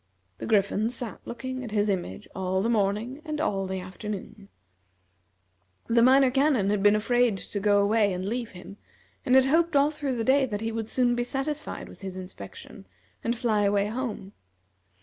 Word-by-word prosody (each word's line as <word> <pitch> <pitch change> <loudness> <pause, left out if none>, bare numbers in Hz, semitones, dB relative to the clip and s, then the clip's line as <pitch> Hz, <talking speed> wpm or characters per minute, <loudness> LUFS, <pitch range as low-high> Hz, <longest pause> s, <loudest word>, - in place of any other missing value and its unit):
The - - -5
Griffin 210 +1 +2
sat 240 -2 -6
looking 255 +2 -5
at 235 - -6
his 210 -1 +1
image 180 - -3
all 190 0 -1
the 230 - +1
morning 220 +6 0
and 305 -2 -4
all 195 -11 0
the 190 0 -3
afternoon. 200 +2 -7 1.4
The 230 0 +3
Minor 260 +1 +6
Canon 265 -7 +2
had 210 -1 +1
been 205 +1 +5
afraid 240 0 +2
to 205 - -5
go 205 0 +3
away 205 0 +3
and 185 0 -3
leave 235 +3 -2
him, 185 +2 -11 0.5
and 255 - +5
had 265 0 +6
hoped 325 +3 +2
all 285 +2 +4
through 290 -4 -3
the 230 - -1
day 265 +2 +3
that 205 -3 -4
he 225 0 -2
would 225 -1 -4
soon 245 -2 +2
be 240 0 0
satisfied 280 +4 -3
with - - -14
his 190 -1 -6
inspection 185 0 -10 0.4
and 235 +1 -1
fly 225 -3 +1
away 200 0 +2
home. 220 -5 -4
225 Hz, 185 wpm, -27 LUFS, 200-255 Hz, 1.4 s, Minor